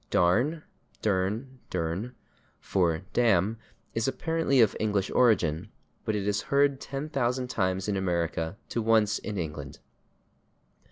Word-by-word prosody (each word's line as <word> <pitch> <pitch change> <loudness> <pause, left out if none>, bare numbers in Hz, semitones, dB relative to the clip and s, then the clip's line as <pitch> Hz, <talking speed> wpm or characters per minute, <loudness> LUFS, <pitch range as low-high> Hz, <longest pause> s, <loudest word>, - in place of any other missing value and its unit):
/Darn/ 125 - +2 0.4
(=/dern/=/durn/) 105 0 -2 0.4
for 85 -2 0
/damn/ 110 -2 +3 0.4
is 115 +2 0
apparently 150 +1 +1
of 110 -4 +5
English 105 -3 0
origin, 90 -11 +3 0.4
but 110 - 0
it 100 -1 -2
is 100 -1 +1
heard 140 -1 +3
ten 140 +2 -4
thousand 125 -3 -1
times 95 0 0
in 105 - 0
America 85 -1 -1
to 120 - -1
once 110 -1 +3
in 105 -2 -5
England. 75 -5 -5
105 Hz, 120 wpm, -28 LUFS, 95-125 Hz, 0.4 s, of